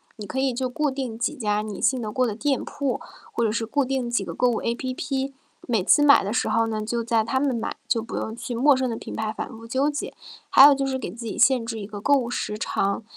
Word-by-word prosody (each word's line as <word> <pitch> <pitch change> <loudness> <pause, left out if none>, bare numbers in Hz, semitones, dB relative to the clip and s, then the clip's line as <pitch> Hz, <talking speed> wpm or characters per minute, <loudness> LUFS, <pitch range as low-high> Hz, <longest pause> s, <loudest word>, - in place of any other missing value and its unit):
你 210 - -8
可 265 - -4
以 265 -2 +1
就 255 +1 -2
固 300 +3 0
定 260 -4 -4
几 240 - -1
家 210 -3 0
你 215 -2 -6
信 260 -3 +2
得 215 - -4
过 255 +4 +1
的 225 - -1
店 270 +5 -1
铺， 275 -4 -3 0.3
或 235 - 0
者 215 - +2
是 225 0 -1
固 285 +5 +1
定 260 -2 -2
几 235 - 0
个 - - -6
购 250 0 +2
物 230 - -1
APP， 265 +3 -2 0.3
每 225 -6 +1
次 295 - +5
买 280 -6 +6
的 200 - -3
时 245 - 0
候 225 +1 +2
呢， 215 -1 -2
就 230 +2 -2
在 225 -1 +1
它 260 - -1
们 270 -1 +1
买， 230 - -3
就 230 -3 +1
不 230 - -7
用 220 - -3
去 240 +1 -5
陌 270 +2 +4
生 260 -1 0
的 225 - -2
品 - - -8
牌 220 0 -2
反 - - -5
复 225 +1 -11
纠 270 +4 +1
结。 290 - -4 0.4
还 275 - +9
有 290 - +8
就 275 0 -1
是 265 - -1
给 260 - -5
自 235 0 -8
己 220 - -5
限 255 -4 +4
制 225 -2 -4
一 - - -5
个 205 0 -8
购 285 - +2
物 250 -4 +2
时 210 -3 -3
长， 200 0 -1
240 Hz, 305 characters per minute, -24 LUFS, 220-265 Hz, 0.4 s, 还